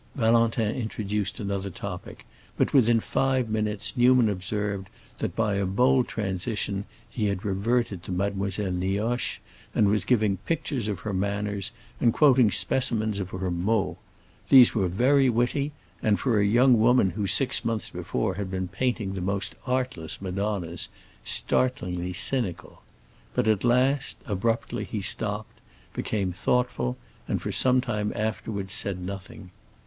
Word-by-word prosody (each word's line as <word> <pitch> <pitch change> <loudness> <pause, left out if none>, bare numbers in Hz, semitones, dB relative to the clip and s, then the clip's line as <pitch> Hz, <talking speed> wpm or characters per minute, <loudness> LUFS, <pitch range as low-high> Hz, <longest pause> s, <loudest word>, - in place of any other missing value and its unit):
Valentin 115 -2 +2
introduced 105 -4 -3
another 100 -2 -3
topic, 90 - -8 0.3
but - - +1
within 120 -3 +5
five 130 +1 0
minutes 105 0 -1
Newman 125 -2 +5
observed 100 0 -3 0.3
that, - - -3
by 110 -2 +1
a 100 - 0
bold 125 +6 +3
transition, 100 0 -2 0.2
he 110 -4 -2
had 100 -1 -2
reverted 105 0 0
to 95 - -8
Mademoiselle 100 +1 -1
Nioche, 100 +7 -1 0.4
and 105 - +4
was 105 +1 +2
giving 105 -5 +2
pictures 145 -8 -2
of 105 -3 -3
her 105 - -4
manners 100 +1 -2 0.3
and 120 -2 +3
quoting 130 -6 +5
specimens 110 0 +1
of 95 -1 -4
her 95 -1 -3
mots. 95 +5 0 0.5
These 130 -3 +8
were 95 -4 +1
very 130 +9 +3
witty, 125 +5 0 0.3
and, 105 -2 +2
for 120 -6 +2
a 100 - +3
young 120 +3 +5
woman 115 -4 +4
who 100 +2 -2
six 105 +8 +2
months 115 -2 -2
before - - -2
had 95 0 -4
been 95 -1 -3
painting 105 -1 -1
the 95 - -4
most 100 +2 -2
artless 125 -11 -2
madonnas, 95 -3 -3 0.3
startlingly 90 -8 0
cynical. 95 -4 -1 0.5
But - - +1
at 110 -3 +2
last, 130 +3 +2
abruptly, 115 +2 -1
he 105 - -4
stopped, 105 +2 -1 0.3
became 100 -4 -2
thoughtful, 95 - 0 0.3
and - - -1
for - - -4
some 130 0 +4
time 105 -4 -2
afterwards 105 -2 -3
said 95 -2 -1
nothing. 90 0 -8
105 Hz, 145 wpm, -26 LUFS, 95-120 Hz, 0.5 s, These